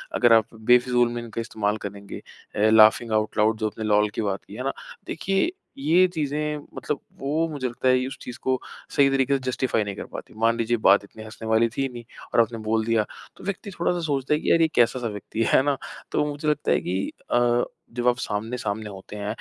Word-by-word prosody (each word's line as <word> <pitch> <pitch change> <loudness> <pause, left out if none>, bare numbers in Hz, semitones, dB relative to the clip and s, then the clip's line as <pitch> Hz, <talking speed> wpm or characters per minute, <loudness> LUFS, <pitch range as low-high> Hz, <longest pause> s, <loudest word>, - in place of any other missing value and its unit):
अगर 120 -2 +5
आप 110 -1 +3
बेफिज़ूल 120 +2 +3
में 120 - -3
इनका 115 0 -5
इस्तेमाल 110 -2 -1
करेंगे। 100 0 -7 0.4
अ, - - -3
लाफिंग 110 +1 +6
आउट 110 0 0
लाउड्स 110 +1 +3
जो 110 - 0
आपने 110 +1 -6
लोल 105 0 +3
की - - -1
बात 100 -2 -2
की। 100 - -11
हैं 125 - -5
ना? 135 - -1 0.3
देखिए 195 - 0 0.3
ये 165 +7 +4
चीज़े 150 -3 -1 0.3
मतलब 150 - -3 0.2
वो 155 +4 0
मुझे 140 -4 -3
लगता 120 +1 -3
है, 130 0 +3
उस 135 - -7
चीज़ 125 - -7
को 130 -1 0 0.4
सही 140 -1 +5
तरीके 135 0 +2
से - - -8
जस्टिफाई 125 -3 0
नहीं 100 -1 -5
कर - - -6
पाती। - - -8
मान 115 +1 +2
लीजिए 120 +1 +1
बात 100 +1 +6
इतनी 110 +2 -12
हँसने 110 +1 -9
वाली 110 +1 +4
थी 135 - +1
नहीं, 120 -1 -8 0.3
और - - +6
आपने 115 0 -1
बोल 110 0 +2
दिया। 115 -2 +2 0.3
तो - - -13
व्यक्ति 200 +1 -4
थोड़ा-सा 175 +1 +1
सोचता 140 -2 0
है 150 - +2
कि - - 0
अरे! 165 - +5
ये - - +5
कैसा-सा 120 0 +3
व्यक्ति 110 +1 -3
है, - - 0
है - - +6
ना? 140 -1 +1 0.3
तो - - +1
मुझे 145 +1 -5
लगता 150 - 0
है - - +4
कि 95 +2 -2 0.2
अ, 120 0 +3 0.3
जब 120 0 0
आप 120 0 +4
सामने-सामने 110 -1 -3
होते 95 +1 -10
हैं, 100 0 -5
120 Hz, 225 wpm, -24 LUFS, 110-135 Hz, 0.4 s, लाफिंग